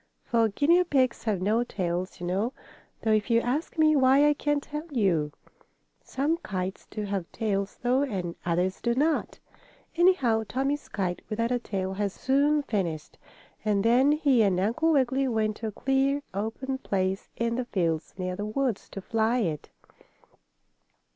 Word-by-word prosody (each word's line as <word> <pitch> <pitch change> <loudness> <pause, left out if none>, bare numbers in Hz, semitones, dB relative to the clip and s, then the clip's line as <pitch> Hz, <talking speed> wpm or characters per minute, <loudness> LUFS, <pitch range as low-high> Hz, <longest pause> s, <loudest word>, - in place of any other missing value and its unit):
For 230 -2 +2
guinea 330 - +3
pigs 265 -9 +1
have 200 -5 0
no 220 +4 +2
tails, 180 -5 -3
you 175 - -5
know, 200 +8 -1 0.5
though 220 - +2
if 215 +1 +2
you 230 0 +4
ask 270 +9 -2
me 310 -1 +5
why 270 +2 +5
I 295 - +4
can't 295 0 -1
tell 300 +2 -6
you. 180 - +1 0.7
Some 290 +5 -1
kites 190 - -5
do 215 - -4
have 195 -4 -3
tails, 200 -3 -2
though, 250 +2 +3
and 190 -11 -3
others 180 +2 0
do 235 0 +1
not. 305 +4 0 0.6
Anyhow, 330 -11 +3
Tommie's 275 +3 -2
kite, 185 -5 -2
without 230 +2 -1
a 245 - +1
tail, 190 -4 -3
was 200 -2 0
soon 285 +2 +2
finished, 175 - -3 0.4
and 205 -2 +1
then 255 +5 +5
he 280 -6 +3
and 195 -4 +2
Uncle 240 - +1
Wiggily 270 -2 +2
went 220 -3 0
to 225 - -4
a - - -3
clear, 270 +5 +1
open 225 +7 -3
place 190 -4 -2
in 230 0 -1
the 250 +1 -2
fields, 170 -8 -1
near 185 -1 -3
the 205 - -4
woods, 225 +1 -2
to 195 - -7
fly 225 +4 +1
it. 160 -7 -3
230 Hz, 165 wpm, -27 LUFS, 195-275 Hz, 0.7 s, me